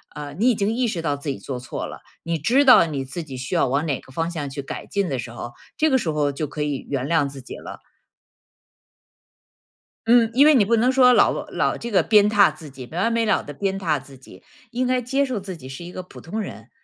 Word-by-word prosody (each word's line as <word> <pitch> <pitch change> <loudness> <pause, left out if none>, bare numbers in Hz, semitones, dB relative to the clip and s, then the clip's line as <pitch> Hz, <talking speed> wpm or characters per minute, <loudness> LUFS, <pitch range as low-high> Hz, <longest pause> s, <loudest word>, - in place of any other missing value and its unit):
呃， 145 -1 -7
你 225 +9 +3
已 245 - +3
经 205 +2 0
意 245 +1 0
识 185 -7 -3
到 145 -3 -1
自 140 - -10
己 135 - -2
做 130 -3 -5
错 125 0 -5
了， - - -9 0.2
你 165 0 -1
知 245 - +3
道 250 -10 +7
你 145 -4 -3
自 135 +6 -6
己 140 -4 -9
需 130 +7 -4
要 170 - +3
往 140 +5 0
哪 140 -4 -1
个 - - -17
方 165 +4 -1
向 150 -4 -4
去 140 +1 -5
改 135 - -7
进 200 -3 -1
的 135 - -2
时 115 0 -6
候， 120 0 -7 0.2
这 315 - +2
个 265 - +4
时 175 - -2
候 150 -1 0
就 145 +3 -3
可 150 +1 -6
以 145 -2 -2
原 135 -2 -2
谅 160 -3 +2
自 135 -1 -9
己 125 - -9
了。 - - -9 2.3
嗯， 230 -1 +5
因 270 +4 +6
为 305 - +7
你 235 -8 +4
不 230 +3 +3
能 240 +3 +3
说 255 -1 +6
老 - - +3
老 - - 0
这 235 - -6
个 205 - +3
鞭 210 -2 +5
挞 205 -2 +5
自 155 -3 -12
己， 130 -2 -10
没 165 - -6
完 225 +6 +1
没 230 0 +1
了 210 - +2
地 145 - -9
鞭 195 +6 -2
挞 155 -7 0
自 135 0 -15
己。 125 -7 -16 0.3
应 250 +1 -1
该 255 0 +1
接 270 +4 0
受 255 -5 -2
自 190 -1 -7
己 130 -5 -11
是 135 +6 -8
一 175 - -9
个 185 - -6
普 180 - -13
通 215 +7 -5
人， 205 - -8
170 Hz, 280 characters per minute, -22 LUFS, 140-230 Hz, 2.3 s, 道